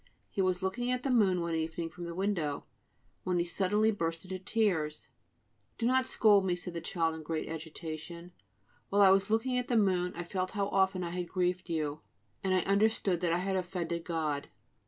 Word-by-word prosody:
He 195 - 0
was 185 0 +1
looking 240 +6 -1
at 250 0 0
the 275 - 0
moon 195 -7 +4
one 170 0 -2
evening 160 +1 -2
from 175 - -7
the 170 0 -6
window, 180 -7 -1 0.6
when 180 -1 0
he 170 - +1
suddenly 205 +5 +2
burst 165 -4 -3
into 185 0 -5
tears. 180 -9 0 0.7
"Do 230 - -1
not 260 +1 +3
scold 205 -5 +5
me," 180 -2 +1
said 180 0 -6
the 170 - -4
child 165 -1 0
in 160 - -7
great 155 +1 -3
agitation; 165 +2 -7 0.6
"while 200 0 +5
I 190 - +8
was 195 +2 +3
looking 250 +3 +1
at 250 - -4
the 240 - +2
moon 185 -4 +2
I 175 - -4
felt 185 +1 -2
how 200 0 +1
often 190 -2 +2
I 170 - -3
had 175 -1 -3
grieved 180 0 -1
you, 155 -2 -2 0.4
and 190 - 0
I 185 -1 +4
understood 200 -2 +2
that 175 -2 +1
I 170 - +3
had 190 +2 -1
offended 175 -2 -2
God." 155 -4 -2
180 Hz, 200 wpm, -31 LUFS, 170-200 Hz, 0.7 s, I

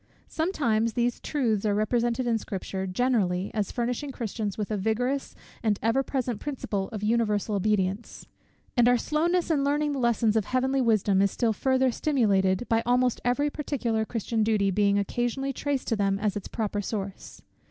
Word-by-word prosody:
Sometimes 235 - 0
these 240 +1 0
truths 230 -9 0
are 210 -2 +1
represented 235 +3 0
in 230 -2 +1
Scripture, 190 -1 -4
generally, 190 -3 0
as 210 -3 -1
furnishing 250 +4 -2
Christians 220 -4 -4
with 210 0 -3
a - - +1
vigorous 245 +7 -1 0.3
and 215 -3 +1
ever 230 +4 +3
present 255 -5 -2
principle 210 -9 -3
of 215 -3 -6
universal 215 -1 +1
obedience. 200 +1 -1 0.5
And 240 -1 +5
our 245 - +5
slowness 335 +6 0
in 285 -3 +2
learning 295 +1 +1
the 280 - -2
lessons 235 -3 +2
of 220 -3 +2
heavenly 260 +1 +1
wisdom 210 -5 +3
is 200 - +4
still 225 +2 0
further 260 +3 +2
stimulated, 205 -8 +1
by 225 0 +2
almost 250 0 +2
every 285 +5 +1
particular 250 -7 -1
Christian 225 0 -2
duty 210 -3 +2
being 200 +1 +2
occasionally 245 +6 -1
traced 280 0 -2
to 225 - +2
them 195 -2 +1
as 205 -1 0
to 205 - -2
its - - -10
proper 210 -2 -2
source. 200 -2 -6
230 Hz, 175 wpm, -27 LUFS, 205-255 Hz, 0.5 s, And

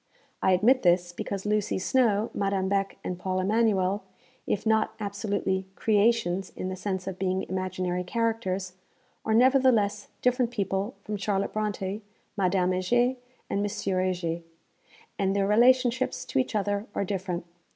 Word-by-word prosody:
I 190 - +4
admit 240 +8 +4
this, 175 0 +3
because 195 +2 -5
Lucy 210 -1 0
Snowe, 220 +1 +2
Madame 195 -1 0
Beck 195 0 0
and 180 -1 -4
Paul 185 0 -1
Emanuel, 200 -1 +2 0.5
if 205 - -1
not 220 0 +2
absolutely 200 -2 -2
'creations,' 205 -4 +2
in 185 - -4
the 185 - -3
sense 190 -1 -3
of 190 -1 -5
being 190 0 0
imaginary 185 -1 -2
characters, 195 -3 -1 0.5
are 220 - +1
nevertheless 235 -5 +4 0.2
different 250 -1 +2
people 200 0 -2
from 210 0 -4
Charlotte 195 0 -1
Brontë, 210 -1 -2 0.3
Madame 185 -2 +2
Heger 240 +8 +2 0.3
and 200 - -1
Monsieur 195 -2 -1
Heger, 175 -2 -1 0.8
and 195 0 +1
their 200 -1 +2
relationships 250 +4 +3
to - - 0
each 130 - -1
other 205 +1 -1
are 200 - 0
different. 185 -3 -3
200 Hz, 140 wpm, -27 LUFS, 185-220 Hz, 0.8 s, I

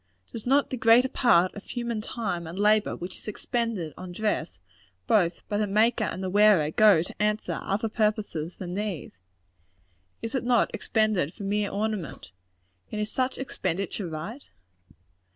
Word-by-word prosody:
Does 230 +1 -7
not 275 +2 +3
the 260 - -2
greater 230 +3 +5
part 185 -10 +3
of 205 - -9
human 235 -3 -3
time 200 -7 -3
and 170 +3 -7
labor 210 +1 +3
which 175 +2 -7
is - - -14
expended 215 - -2
on 185 -1 -8
dress, 210 - -2 0.5
both 175 - +1
by 205 - -1
the 210 - +1
maker 215 +3 +2
and 185 +1 -4
the 185 - -2
wearer, 200 -7 +5
go 205 -4 +5
to 185 - -9
answer 210 +1 0
other 205 +3 -1
purposes 210 -7 -1
than 180 -2 -6
these? 195 - -4 1.0
Is 225 - -3
it 265 - -1
not 240 -1 +3
expended 215 -7 0
for 210 - -8
mere 205 +1 0
ornament? 205 - -3 0.6
And 210 - -3
is 210 +1 -2
such 255 0 -1
an - - -3
expenditure 195 -4 -3
right? 170 - -7
210 Hz, 165 wpm, -27 LUFS, 180-225 Hz, 1.0 s, greater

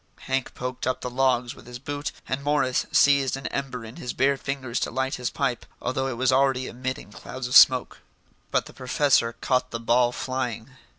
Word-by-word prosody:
Hank 130 -1 -2
poked 125 0 -4
up 130 - -1
the 125 - -4
logs 125 -1 +1
with - - -16
his 125 0 -7
boot, 145 +3 -4 0.2
and 130 +2 -2
Morris 145 -3 +1
seized 140 -2 +4
an 135 - -9
ember 130 -4 -4
in 115 +2 -10
his 125 - -5
bare 140 +2 +3
fingers 135 -3 -3
to - - -1
light 130 +1 -1
his 125 - 0
pipe, 120 -2 -1 0.2
although 130 +1 -1
it 125 -3 -4
was 130 +1 +2
already 130 -1 +2
emitting 125 -3 -5
clouds 125 +4 -7
of 125 - -2
smoke. 130 -1 +6 0.5
But - - +1
the - - -12
professor 130 -2 +2
caught 130 -1 +1
the 115 - -4
ball 120 +1 +3
flying. 125 -1 -4
130 Hz, 195 wpm, -25 LUFS, 125-135 Hz, 0.5 s, smoke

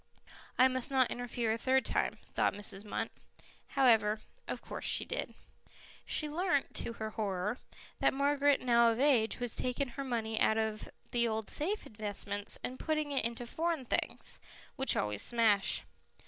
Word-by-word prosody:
"I 255 - +7
must 255 +1 0
not 260 -2 +3
interfere 240 -2 -2
a 225 - -1
third 265 +2 +2
time," - - 0 0.2
thought - - +1
Mrs. 205 -1 -3
Munt. 210 - -3 0.7
However, 225 -5 +4 0.3
of - - -3
course - - -7
she - - +3
did. - - -4 0.7
She 305 - +2
learnt, 330 -1 0
to 235 - -4
her 220 -1 -5
horror, 205 +1 -2 0.4
that - - +4
Margaret, 285 +1 +2
now 235 -1 +5
of 225 - -3
age, 255 -6 +3
was 245 -2 -1
taking 255 +1 -1
her 275 +3 -5
money 225 -4 -2
out 220 - +3
of 220 -1 -2 0.2
the 235 -1 +2
old 220 -1 -2
safe 390 +8 0
investments 205 -1 -2
and 255 +1 -4
putting 305 -2 -1
it 275 - +1
into 235 +1 -3
Foreign 320 +2 -2
Things, - - -2 0.4
which 265 -1 +4
always 105 -1 -1
smash. 220 -4 +3
240 Hz, 160 wpm, -33 LUFS, 220-270 Hz, 0.7 s, I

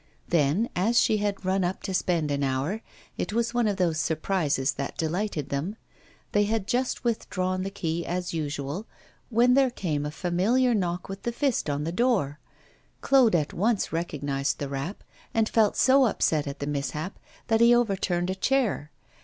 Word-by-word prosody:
Then, 170 +7 +2
as 225 +7 +3
she 220 -3 +3
had 205 -2 -2
run 190 0 +1
up 180 +2 -2
to 190 - -3
spend 170 -5 0
an 140 0 -1
hour 135 +11 -1 0.4
it - - -2
was 235 +1 0
one 240 -2 +2
of 205 -2 0
those 170 -4 +1
surprises 155 -5 0
that 140 0 -5
delighted 165 -2 -2
them 150 +9 -2 0.6
they 205 0 +3
had 215 -1 -1
just 250 +4 -1
withdrawn 185 -5 -1
the 195 - -2
key, 170 -4 -3
as 180 +1 -3
usual, 150 +4 -3 0.4
when 245 +2 +4
there 270 0 +4
came 160 - -2
a 150 - -2
familiar 195 +11 +1
knock 180 -4 -1
with 195 0 -7
the 240 - -2
fist 260 - 0
on 145 0 -1
the 165 - -2
door. 185 - +1 0.6
Claude 260 -8 +5
at 155 -3 0
once 210 +1 0
recognised 145 -4 -1
the 140 - -4
rap, 140 +8 -5 0.3
and 225 -1 +3
felt 220 -3 +2
so 265 0 +5
upset 155 -8 +1
at 140 - -5
the 140 - -4
mishap 145 +5 -3 0.3
that 225 0 +2
he 235 +1 +7
overturned 190 -6 0
a - - 0
chair. 210 - 0
185 Hz, 180 wpm, -26 LUFS, 150-225 Hz, 0.6 s, he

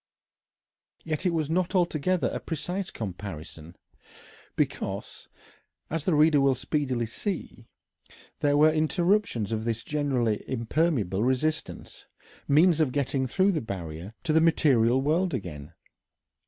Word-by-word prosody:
Yet 160 +3 -2
it - - +4
was 160 -3 -1
not 180 +4 0
altogether 175 0 +1
a - - -2
precise 175 +4 -4
comparison, 90 -5 -7 0.8
because, - - -3 0.6
as 165 -1 -2
the 180 - +2
reader 150 -1 +5
will 135 -1 +3
speedily 130 -2 -1
see, 120 - -5 0.7
there 145 0 +2
were 155 +1 +5
interruptions 160 - +1
of 110 -1 -2
this 115 -1 -2
generally 130 -8 0
impermeable 115 - 0
resistance, 140 +5 -2 0.4
means 160 +3 +4
of 145 -5 +2
getting 135 -1 -1
through 190 +9 +2
the 160 - -1
barrier 90 -1 -7
to 155 - 0
the 160 - +5
material 130 -7 +4
world 170 +5 +1
again. 75 -4 -7
145 Hz, 125 wpm, -27 LUFS, 115-165 Hz, 0.8 s, reader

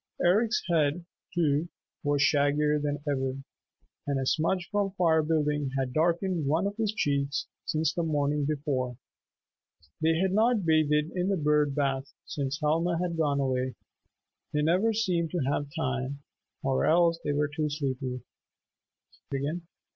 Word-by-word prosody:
Eric's 215 +6 +3
head, 165 0 +1 0.3
too, 160 -1 +1 0.3
was 145 -2 +2
shaggier 150 0 +3
than 145 0 -2
ever, 135 -2 -1 0.7
and 140 -1 0
a 135 - -1
smudge 175 +5 +1
from 200 -2 0
firebuilding 155 -4 +2
had 130 -2 -1
darkened 170 0 +1
one 160 +6 +2
of 200 +1 -2
his 220 -3 0
cheeks 140 -8 0 0.2
since 160 +1 +1
the 175 - -1
morning 150 -2 0
before. 140 -4 -1 1.0
They 160 +1 +3
had 190 +2 +1
not 220 -1 +3
bathed 155 -1 +3
in 180 +1 0
the 195 - +1
"bird 150 -2 +2
bath" 135 -1 -1
since 140 0 -3
Helma 165 +3 +1
had 175 -1 -1
gone 145 -3 +1
away. 130 -1 -1 0.8
They 150 0 +1
never 185 +8 +3
seemed 180 -7 0
to 175 - 0
have 145 0 -1
time, 135 -1 -2 0.4
or 135 -1 +1
else 165 0 +4
they 145 - 0
were 145 +1 +1
too 155 -2 0
sleepy. 130 -3 -3
150 Hz, 140 wpm, -28 LUFS, 140-170 Hz, 1.0 s, else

